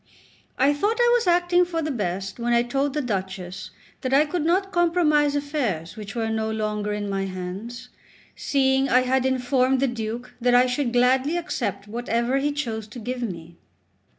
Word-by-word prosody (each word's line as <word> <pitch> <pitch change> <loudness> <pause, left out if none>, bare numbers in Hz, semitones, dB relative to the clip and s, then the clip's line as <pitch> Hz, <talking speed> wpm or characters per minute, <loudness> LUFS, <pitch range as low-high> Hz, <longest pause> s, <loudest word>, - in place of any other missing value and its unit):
I 275 +3 +4
thought 410 +10 0
I 480 0 +5
was 460 -5 0
acting 350 0 +4
for 335 -2 -2
the 310 - -2
best 195 -3 -3
when 240 0 0
I 235 0 +4
told 275 +3 -1
the 300 - 0
Duchess 190 -4 -4 0.3
that 260 0 +1
I 295 +2 +5
could 315 +1 -2
not 380 +4 +1
compromise 325 -5 +3
affairs 260 - -2
which 210 -1 -8
were 225 -1 -1
no 220 0 -1
longer 210 -1 -2
in 210 0 -3
my 195 -1 -1
hands, 190 +6 -6 0.5
seeing 270 -1 +1
I 255 0 +5
had 260 +1 +1
informed 260 0 +1
the 275 - +3
Duke 240 +1 -5
that 245 0 +3
I 250 +1 +6
should 250 0 -1
gladly 260 +6 +3
accept 230 - -3
whatever 235 +3 -1
he 290 +2 0
chose 230 -7 -4
to 215 - -11
give 250 +3 -4
me. 170 -6 -6
250 Hz, 180 wpm, -24 LUFS, 215-290 Hz, 0.5 s, I